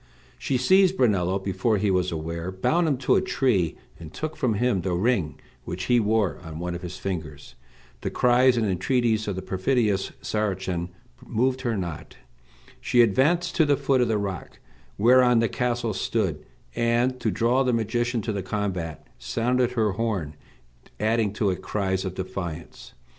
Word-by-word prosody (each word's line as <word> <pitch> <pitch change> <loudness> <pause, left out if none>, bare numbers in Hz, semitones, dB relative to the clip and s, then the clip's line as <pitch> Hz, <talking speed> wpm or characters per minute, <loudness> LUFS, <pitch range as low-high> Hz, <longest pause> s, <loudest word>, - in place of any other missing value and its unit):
She 130 - 0
seized 190 +8 +4
Brunello 95 -6 +2
before 100 +3 0
he 100 0 +1
was 90 -1 +1
aware, 85 +2 -4
bound 160 - +1
him 140 -4 +1
to - - +4
a - - +4
tree, 120 - 0 0.2
and 80 -2 -10
took 155 0 -5
from 115 -4 0
him 120 -3 +1
the 90 0 -1
ring 90 - 0 0.2
which 90 +2 -5
he 120 +5 +3
wore 110 -3 +1
on 80 -2 -8
one 90 +1 -3
of 85 - -6
his 90 -1 -7
fingers. 80 -9 -6 0.5
The - - -2
cries 125 0 +3
and 115 - +1
entreaties 110 +3 +1
of 100 - -2
the 95 - -5
perfidious 100 0 0
Saracen 95 -4 -2 0.3
moved 130 +3 0
her 115 -4 -1
not. 85 -5 -6 0.6
She 120 -1 +4
advanced 165 - +2
to 165 - +6
the 145 -1 +3
foot 135 -2 +2
of 120 - +2
the 110 - +1
rock 100 -3 -5 0.4
whereon 125 +2 +5
the 115 0 +3
castle 120 -2 -1
stood, 95 - -2 0.3
and, 120 +2 +1
to - - 0
draw 120 +3 +2
the 130 -2 +2
magician 120 0 -1
to 110 - -2
the 100 - -2
combat, 95 -5 -3
sounded 125 - 0
her 110 -4 +1
horn, 95 -8 -2 0.7
adding 110 -1 +1
to 105 -1 +1
it 90 - -5
cries 95 -2 -2
of 95 -1 -4
defiance. 90 -3 -6
105 Hz, 170 wpm, -25 LUFS, 95-125 Hz, 0.7 s, to